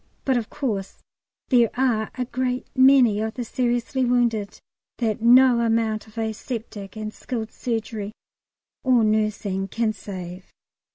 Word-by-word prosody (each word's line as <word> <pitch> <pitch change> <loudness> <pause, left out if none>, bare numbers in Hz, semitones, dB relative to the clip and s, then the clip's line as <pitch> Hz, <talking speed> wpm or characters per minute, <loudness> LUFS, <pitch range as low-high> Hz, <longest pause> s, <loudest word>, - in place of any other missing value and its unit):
But, 265 - +2
of 235 -3 -1
course, 215 -10 -3 0.5
there 240 -4 +5
are 240 -4 +1
a 250 - -1
great 255 0 -2
many 260 -5 +6
of 220 0 -3
the 245 - -3
seriously 245 +2 -1
wounded 235 -4 +1 0.4
that 220 -3 -1
no 245 +1 +6
amount 225 -2 0
of 220 - -19
aseptic 220 -2 -5
and 215 0 -5
skilled 225 -3 -5
surgery 220 -3 -4 0.7
or 250 -3 +4
nursing 215 -3 0
can 225 +2 -1
save. 185 -2 -8
225 Hz, 130 wpm, -23 LUFS, 215-245 Hz, 0.7 s, many